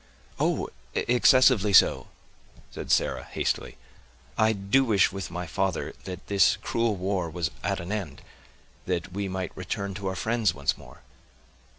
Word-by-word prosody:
"Oh! - - 0 0.3
excessively 125 -4 +4
so," - - +5 0.6
said - - -8
Sarah - - +1
hastily. - - -3 0.6
"I 110 0 +3
do 100 +6 +2
wish, 105 -8 +3
with 95 0 -5
my 90 +1 -5
father, 95 +3 -2
that 90 0 -7
this 100 -1 +3
cruel 115 -2 0
war 95 -2 -2
was 80 -1 -2
at - - -1
an 85 +3 -6
end, 95 -10 -5 0.6
that 90 -1 -2
we 100 0 -2
might 95 -1 -4
return 100 +2 -4
to 100 0 -5
our 95 - -2
friends 110 -5 0
once 70 0 0
more." - - -16
95 Hz, 150 wpm, -26 LUFS, 90-105 Hz, 0.6 s, so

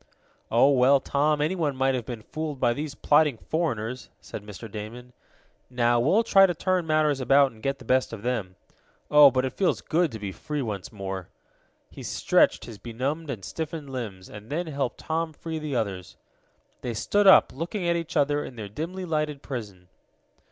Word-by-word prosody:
"Oh, 120 +5 +5
well, 135 +1 +5
Tom, 145 +2 +1
anyone 155 -3 0
might 135 0 +2
have 125 -3 -3
been 115 -3 -6
fooled 155 -1 -5
by 120 - +3
those 145 +2 -5
plotting 150 -4 +3
foreigners," 125 -6 -3
said - - -8
Mr. 105 +1 -9
Damon. 115 +4 -8 0.6
"Now, 120 -1 +2
we'll 175 - +3
try 195 -3 +6
to 175 - -2
turn 185 0 0
matters 155 -3 +2
about 135 +1 +4
and 110 -1 -18
get 135 +2 -1
the 130 - -14
best 130 +2 +2
of 110 -2 -8
them. 110 -7 -2 0.6
Oh, 150 -1 +9
but 130 0 0
it 130 - -3
feels 190 - +1
good 165 -1 +1
to 110 - -6
be 100 -2 -5
free 150 +8 -4
once 105 -5 -5
more!" 95 -3 -6 0.6
He - - -10
stretched - - +2
his 110 -3 -10
benumbed 135 +7 -3
and 110 -8 -5
stiffened 155 -3 -5
limbs 105 -8 -6
and 105 +2 -11
then 170 +4 -2
helped 140 -5 -3
Tom 160 0 -2
free 160 +1 -5
the 150 -3 -4
others. 95 -6 -3 0.6
They 120 -2 -4
stood 205 - +2
up, 190 - +7
looking 175 +6 -3
at 170 - +2
each 165 -1 -3
other 145 +1 +2
in 125 - -9
their 105 -3 -7
dimly 170 - -5
lighted 150 -3 -2
prison. 105 -9 -7
135 Hz, 185 wpm, -26 LUFS, 115-155 Hz, 0.6 s, Oh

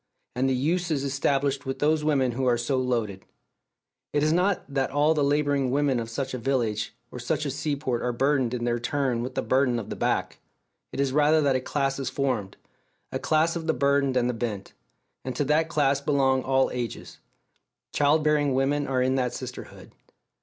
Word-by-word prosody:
And 130 +2 +1
the 130 - +1
use 170 +7 0
is 145 -4 0
established 140 0 0
with 135 - -2
those 150 +1 +1
women 135 -5 +2
who 130 +2 -1
are 120 -1 +3
so 120 +3 -1
loaded. 115 -7 -1 0.9
It 145 0 +2
is 155 +1 +3
not 180 +3 +1
that 135 -2 -1
all 145 +3 +3
the 150 -2 +1
labouring 145 -2 +1
women 135 -1 +1
of 115 -1 -5
such 130 +3 -4
a 125 - -3
village 115 -4 -1 0.2
or 125 - -7
such 125 +5 -2
a 140 - -1
sea 145 +2 -2
port 130 -4 -2
are 125 - 0
burdened 130 -1 +1
in 120 - -4
their 120 0 0
turn 130 -1 -1
with 125 +2 -5
the - - -1
burden 130 -2 +2
of 110 - -6
the - - -3
back; - - -1 0.5
it - - -6
is 140 -1 +1
rather 150 +2 +4
that 140 -3 +2
a 130 - 0
class 135 0 -1
is 135 -2 -2
formed, 130 -8 -2 0.5
a - - -2
class 160 +2 +2
of 165 -1 -4
the 160 - +2
burdened 140 0 +2
and 120 -1 +2
the 125 - 0
bent; 110 -4 -4 0.5
and 130 -1 -4
to 145 - 0
that 155 +3 +2
class 140 -4 +2
belong 135 -2 +2
all 130 0 +1
ages; 120 -2 -5 0.7
child 150 +2 +3
bearing 150 -3 +2
women 140 +2 +1
are 130 -1 +1
in 130 +1 +1
that 125 -2 -1
sisterhood. 125 -1 -9
135 Hz, 205 wpm, -26 LUFS, 125-145 Hz, 0.9 s, rather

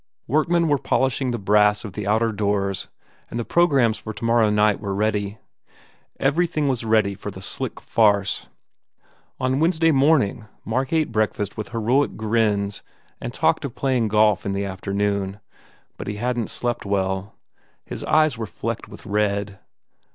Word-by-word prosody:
Workmen 165 +4 +2
were 145 -2 +2
polish 130 +1 0
ing 130 - 0
the 120 - -1
brass 105 +1 +3
of 100 - -7
the 105 0 -5
outer 110 +2 +2
doors 100 -2 -1 0.4
and 120 - -4
the 120 - -3
programs 135 -10 +3
for 110 - -7
tomorrow 115 -1 +2
night 105 -1 +3
were 100 -2 -3
ready. 105 0 -1 0.8
Everything 155 +1 +1
was 130 -3 0
ready 110 -3 +2
for 100 +1 -7
the 95 - -9
sick 95 - -3
farce. 100 -3 +2 0.9
On 130 +1 0
Wednesday 165 0 +3
morning 135 -6 +2 0.2
Mark 130 +4 -1
ate 160 -4 +1
breakfast 105 -2 -1
with 110 - -5
heroic 120 +5 +1
grins 105 -2 0 0.4
and - - -4
talked - - +1
of 135 -3 -5
playing 125 -3 +1
golf 105 -1 +3
in 100 - -2
the 100 +1 -1
afternoon. 100 +1 -2 0.6
But - - -7
he 105 - -3
hadn 120 +1 -1
t - - -9
slept 120 -1 -3
well. 95 0 -2 0.5
His - - -6
eyes 155 -6 +3
were 110 - -3
flecked 90 - -5
with - - -12
red. 100 -1 -1
110 Hz, 160 wpm, -23 LUFS, 100-130 Hz, 0.9 s, brass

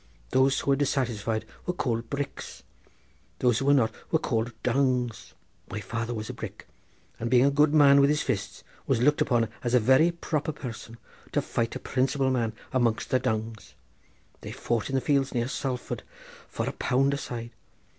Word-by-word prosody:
Those 135 +1 +3
who 140 - +1
were - - +5
dissatisfied 120 -6 -1 0.2
were 180 - -1
called 115 -6 -2
bricks; 140 0 -5 0.7
those 120 -3 +2
who 135 - -2
were 140 - +5
not 115 -5 +3 0.2
were 160 - +4
called 120 -6 -1
dungs. 125 -2 0 0.3
My 110 - -4
father 115 +3 -4
was 110 -2 -4
a - - -5
brick; - - -8 0.5
and, 115 - -2
being 125 +1 +5
a 140 - +4
good 145 +1 +4
man 140 -2 +7
with 140 - +5
his 150 0 +1
fists, 110 -4 -3 0.2
was 135 -4 +2
looked 145 +5 +3
upon 115 -3 +2 0.2
as 120 0 +1
a - - +6
very 130 +9 +5
proper 155 -3 -2
person 115 -4 -8 0.4
to - - +2
fight 115 0 -2
a - - -3
principal 135 +1 0
man 115 -3 0 0.2
amongst 120 -4 +1
the 130 - +4
dungs. 110 -1 -3 0.6
They - - -8
fought 115 0 -2
in 135 - -2
the 130 - +2
fields 140 -2 +1
near 120 0 +1
Salford 130 -2 -3 0.5
for - - -3
a - - 0
pound 135 +2 +1
a - - -1
side. 120 -4 -6
125 Hz, 185 wpm, -27 LUFS, 115-140 Hz, 0.7 s, man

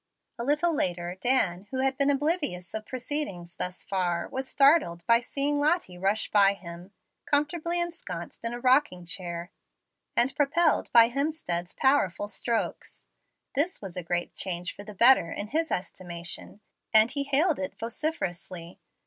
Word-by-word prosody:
A - - -2
little 300 +6 +2
later, 175 - -1
Dan, 205 -7 +1
who 260 0 -2
had 270 0 +1
been 280 +1 +2
oblivious 285 - -1
of 215 0 -5
proceedings 245 - -4
thus 180 0 -3
far, 180 -3 -1
was 265 0 -4
startled 275 - +3
by 230 0 +5
seeing 285 +4 -1
Lottie 295 - +1
rush 200 +3 +1
by 200 -1 +5
him, 175 -1 -10 0.4
comfortably 320 +4 0
ensconced 345 -7 -5
in 230 - -1
a 240 - -5
rocking 255 -8 +2
chair 175 0 -3 0.6
and 250 +3 +2
propelled 310 +3 +2
by 230 -1 +7
Hemstead's 245 - -2
powerful 235 -8 +2
strokes. 230 +2 -2 0.5
This 335 +7 0
was 195 -4 -8
a 180 - -3
great 175 +1 -2
change 180 -1 -1
for 205 - -9
the 210 0 -10
better, 235 -6 +6
in 205 +1 -5
his 320 +4 0
estimation, 175 +2 -5 0.3
and 220 +2 +5
he 280 +1 -1
hailed 280 - +2
it 185 - -5
vociferously. 185 - -3
230 Hz, 150 wpm, -27 LUFS, 180-285 Hz, 0.6 s, by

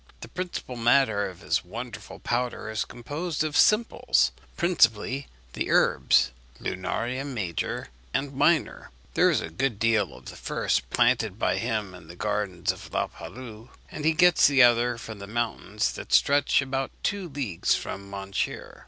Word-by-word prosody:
The - - -7
principal 180 -8 -5
matter 115 -4 +3
of 90 - -13
his - - 0
wonderful - - -8
powder 120 -2 -2
is 110 - -1
composed 150 +7 -4
of 155 -1 -3
simples, 215 +2 +3 0.3
principally 135 - +2 0.3
the - - -3
herbs 65 +2 +4 0.3
Lunaria 115 +8 -3
major 105 - -3 0.2
and 135 +1 -2
minor. 150 +3 +1 0.2
There - - +4
is - - +2
a 80 - -6
good 115 +6 -1
deal 110 -3 +1
of - - -15
the - - -8
first 65 0 -1
planted 120 -5 +2
by - - +1
him 110 -5 -2
in 90 -3 -13
the 85 - -11
gardens 105 -3 -1
of - - -11
La - - +1
Palu; 110 +6 -10 0.2
and 150 - -6
he 160 +1 +3
gets 175 +2 +6
the 140 -2 +6
other 120 0 +4
from 110 -2 -8
the 100 - -8
mountains 115 +1 -1
that - - -9
stretch 140 0 +4
about 135 0 -2
two 200 -3 -1
leagues 130 - 0
from 100 0 -6
Montier. 100 0 -4
120 Hz, 160 wpm, -26 LUFS, 100-140 Hz, 0.3 s, gets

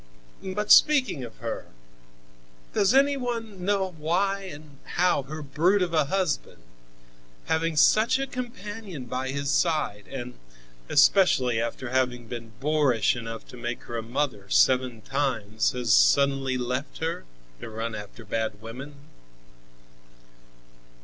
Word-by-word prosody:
But, 205 +2 -2
speaking 265 - +5
of 115 -2 -9
her, 115 0 -5 1.1
does 195 - +3
any 280 +2 +4
one 230 -7 -4
know 195 -1 0
why 195 +5 0
and 145 -1 -13 0.2
how 180 -4 +3
her 155 +3 -7
brute 175 +8 +2
of 170 -2 -3
a 155 -3 +3
husband, 165 - -2 0.8
having 160 0 0
such 215 - +5
a 270 - -1
companion 210 - -7
by 130 +2 -3
his 140 +1 -2
side, 150 - 0
and 125 -2 -6 0.6
especially 135 - +4
after 120 +1 -4
having 125 -2 0
been 115 -1 -8
boorish 140 -8 +2
enough 115 -1 -7
to 125 - -11
make 120 0 -4
her 120 - -7
a 115 - -1
mother 115 -4 -3
seven 125 0 +3
times, 110 -5 -1
has 120 -3 +1
suddenly 135 -1 +4
left 125 +3 -3
her, 160 +1 -3 0.4
to - - -7
run 115 +1 -4
after 105 +1 -9
bad 110 -1 -2
women?" 125 +7 -9
140 Hz, 130 wpm, -26 LUFS, 120-180 Hz, 1.1 s, speaking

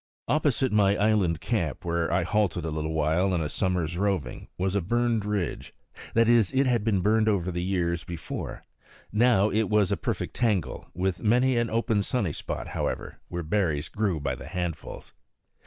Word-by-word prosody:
Opposite 140 -4 +1
my 100 -1 +4
island 100 -6 +2
camp, - - -2
where 85 -1 0
I - - +2
halted 90 -6 0
a 80 - -2
little 80 +1 -2
while, 80 +5 +2
in 85 - 0
a 75 - -1
summer's 90 -2 -1
roving, 100 -5 -1
was 95 +1 0
a 100 - +1
burned 115 +2 0
ridge; 105 -5 -3 0.4
that 115 0 +5
is, 115 -5 +4
it 135 +1 +4
had 120 -4 +2
been 105 -4 +1
burned 110 +2 +3
over 95 -3 0
years 85 -1 -1
before; 85 -2 -6 0.5
now 110 -2 +4
it 110 +1 +1
was 105 -3 +3
a - - +1
perfect - - -3
tangle, 105 -8 -1
with 95 -1 -1
many 125 +4 +3
an 120 -1 +1
open 115 -2 +1
sunny 100 -6 -1
spot, - - -5
however, - - -3
where 85 0 -4
berries 80 -3 0
grew 100 -6 -1
by 70 -3 -2
handfuls. 90 -3 -5
100 Hz, 170 wpm, -27 LUFS, 85-110 Hz, 0.5 s, that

